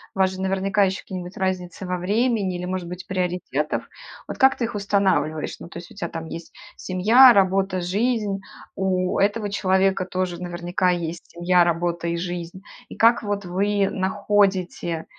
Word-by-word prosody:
у - - -7
вас 190 0 +4
же 190 - -7
наверняка 195 +1 +1
ещё 190 0 -2
какие-нибудь 180 -1 -7
разницы 185 -1 -3
во 180 0 -2
времени 205 +1 0
или, 175 0 -4
может 180 -1 -3
быть, 180 +1 -7
приоритетов, 180 -6 -2 0.4
вот - - -6
как 265 0 +5
ты - - -3
их 230 -1 -3
устанавливаешь? 195 -6 0
Ну, - - -9
то 170 - -10
есть 170 - -12
у - - -14
тя 190 -4 -3
там 165 -1 -6
есть 165 +1 -8 0.2
семья, 225 +8 +6
работа, 190 -2 +2
жизнь, 205 +2 0 0.4
у 185 -1 0
этого 205 +1 +1
человека 190 -1 +2
тоже 180 -1 -3
наверняка 175 +1 -1
есть 170 -1 -3
семья, 175 +1 +3
работа 170 0 -1
и 170 - -1
жизнь. 175 +1 -5 0.3
И - - -10
как 230 +1 +4
вот 205 -1 -2
вы 195 +2 +1
находите 190 -4 0
185 Hz, 170 wpm, -23 LUFS, 175-200 Hz, 0.4 s, семья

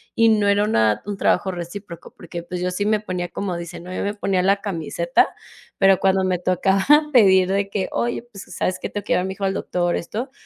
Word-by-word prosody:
y 230 - +4
no 210 -2 +3
era 205 +1 +3
una 110 - +2
un 205 0 -4
trabajo 195 -1 +1
recíproco 175 0 -8
porque, 170 -1 -8
pues, 180 +1 -6
yo 180 - 0
sí 205 +3 -2
me 215 0 +2
ponía, 180 -4 -4
como 190 -3 -4
dicen, 170 0 -8
¿no?, 185 - -7
yo - - -2
me 205 - -1
ponía 195 -3 0
la 195 +2 +3
camiseta, 200 - 0 0.5
pero 195 -1 +4
cuando 190 0 +2
me 185 -1 +1
tocaba 190 +2 +1 0.3
pedir 190 -6 +5
de 195 0 0
que: 195 -2 -2
"Oye, 235 0 -1
pues, 200 -5 -10
¿sabes 185 - -1
qué?, - - -5
tengo 205 -1 -5
que - - 0
llevar 180 - +1
a - - -3
mi 190 - -4
hijo 200 - -3
al 195 - 0
doctor", 175 -2 -1
esto, 230 +10 -5
190 Hz, 235 wpm, -21 LUFS, 180-205 Hz, 0.5 s, pedir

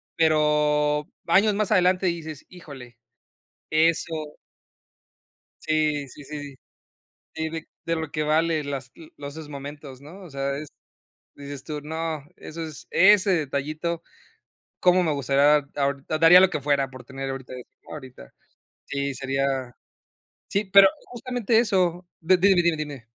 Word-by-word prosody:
Pero 150 -1 +2 0.2
años 200 +5 +4
más 210 0 -1
adelante 185 -1 +3
dices 160 -4 -4
híjole, 135 -9 -12 0.7
eso. 160 -1 0 1.3
Sí, 155 -2 0
sí, 145 +3 -13
sí. 145 -1 -8 0.8
Sí, 160 0 -3
de 160 0 -7 0.2
de 165 - 0
lo 160 -2 -4
que 155 - -1
vale 155 +1 +1
las 135 -3 -5 0.3
los 140 0 -7
esos 160 -2 -9
momentos, 140 -1 -9
¿no? 165 +8 -12
O 180 - -11
sea, 140 0 -3
es, 150 +1 -7 0.7
dices 140 -1 -8
tú, 150 -1 -5
no, 160 0 -4
eso 165 +1 -7
es 155 -2 -9
ese 200 +1 +5
detallito 155 +1 -2 0.8
cómo 180 0 +4
me 160 -3 +1
gustaría 140 +1 +3
ahor 140 -1 -1
daría 165 +3 +7
lo 190 0 +5
que 150 - -3
fuera 140 -1 +1
por 130 -1 -12
tener 135 0 -6
ahorita 130 -1 -7
eso 125 -1 -10 0.2
ahorita. 130 - -11 0.5
Sí, 140 0 -3
sería. 135 -1 -2 0.8
Sí, 200 +2 0
pero 195 0 +8 0.2
justamente 245 -2 0
eso, 185 -6 +1
de 185 +2 +3
dime, 190 -1 +4
dime, 170 -2 +1
dime. 145 -5 -6
155 Hz, 140 wpm, -24 LUFS, 140-170 Hz, 1.3 s, pero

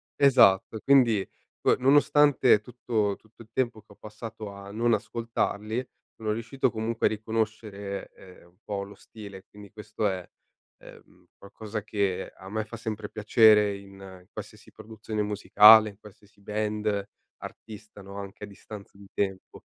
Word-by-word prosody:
Esatto, 110 -6 +4
quindi 120 -8 +4 0.3
poi - - +3
nonostante 140 -3 +4
tutto 110 -3 -2
tutto 110 +1 -21
il 110 - -24
tempo 120 -3 -1
che 105 - -24
ho - - -23
passato 110 0 -9
a 100 0 -11
non 115 +3 +1
ascoltarli 115 +1 -2 0.4
sono 110 -1 -1
riuscito 115 +4 -1
comunque 115 +1 0
a - - 0
riconoscere 110 -2 -4
ehm, 90 -2 -16
un 85 +1 -28
po' 100 -1 -4
lo 100 +1 -11
stile, 100 -3 -12
quindi 100 -1 -14
questo 105 0 -5
è, 95 -3 -4 0.5
ehm, - - -17
qualcosa 105 +2 -7
che 100 -3 -2
a 95 - -13
me 110 +1 -2
fa 120 +3 -9
sempre 110 -2 -5
piacere 105 -1 +4
in 95 -2 -13
qualsiasi 105 0 -11
produzione 110 0 -5
musicale, 105 +1 +7
in 100 0 -16
qualsiasi 105 0 -18
band, 105 -1 -2 0.3
artista, 105 -1 -11
no? 100 +1 -10
Anche 100 +1 -9
a - - -14
distanza 100 0 -12
di 100 - -14
tempo. 95 -2 -4
105 Hz, 150 wpm, -27 LUFS, 100-110 Hz, 0.5 s, musicale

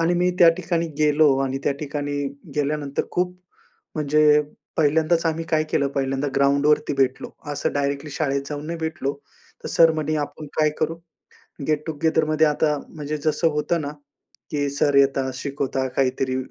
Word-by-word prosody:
आणि 165 +2 +2
मी 180 +1 +2
त्या 175 - +8
ठिकाणी 170 -2 -1
गेलो 150 -2 +4
आणि 135 0 -2
त्या 145 - +2
ठिकाणी 145 0 -3 0.4
गेल्यानंतर, 145 -1 -1
खूप 180 0 -1 0.6
म्हणजे 150 0 +4 0.4
पहिल्यांदाच 160 +2 +2
आम्ही 165 0 -1
काय 155 -1 +3
केलं? 140 - +1
पहिल्यांदा 135 0 -1
ग्राउंडवरती 140 +2 +3
भेटलो. 135 -1 0 0.2
असं 145 - -1
डायरेक्टली 140 +1 -2
शाळेत 140 -1 -1
जाऊन 150 0 -5
नाही 170 +1 -4
भेटलो. 160 -4 -2 0.5
तर - - -3
सर 165 -1 +5
म्हणे, 155 -1 -1
"आपण 155 +1 -10
काय 155 -1 +4
करू?" 160 +1 -1 0.7
गेट 150 -1 0
टू 160 - -2
गेदरमध्ये 160 -1 +3
आता, 150 0 +1
म्हणजे 150 -1 -5
जसं 160 +2 +2
होतं 150 +3 0
ना, 145 -1 -4 0.6
की 145 -1 0
सर 140 +1 +1
येतात, 135 -1 +3
शिकवतात 135 -1 -2
काहीतरी, 130 -1 +1
150 Hz, 155 wpm, -23 LUFS, 140-160 Hz, 0.7 s, त्या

